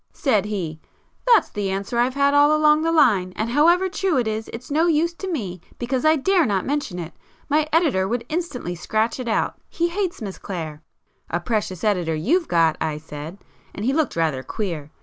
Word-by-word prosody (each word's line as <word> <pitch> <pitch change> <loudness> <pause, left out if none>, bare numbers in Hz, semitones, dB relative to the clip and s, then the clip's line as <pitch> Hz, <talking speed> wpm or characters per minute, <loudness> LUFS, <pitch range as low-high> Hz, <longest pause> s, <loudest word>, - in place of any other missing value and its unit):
Said 220 - +1
he—'That's 210 - -1
the 205 -2 -2
answer 195 +5 -2
I've 250 +2 +1
had 280 0 +3
all 290 +1 +5
along 305 0 +4
the 330 +1 +1
line, 215 - +3
and 225 +2 -2
however 340 +7 +4
true 375 -4 0
it 240 -3 +1
is, 220 0 -3
it's 245 +4 -9
no 320 +4 +3
use 335 +1 +2
to 375 +2 -5
me 190 - -4 0.2
because 250 +3 -2
I 310 +1 +6
dare 355 +5 +3
not 195 -3 0
mention 285 -10 -2
it. 170 -2 -6 0.4
My 305 +1 +2
editor 295 - +2
would 235 +2 -2
instantly 310 - -3
scratch 220 +7 -1
it 250 - -4
out—he 335 +8 -1
hates 370 0 -2
Miss 200 -5 -6
Clare.' 160 -5 -6 0.5
'A 175 - -1
precious 205 -4 -2
editor 180 -7 +1
you've 320 - +1
got!' 165 -2 +3
I 155 -2 -1
said, 155 +3 -8 0.4
and 205 - -4
he 265 - +2
looked 310 -3 0
rather 160 -5 0
queer. 165 - -4
235 Hz, 190 wpm, -22 LUFS, 185-310 Hz, 0.5 s, I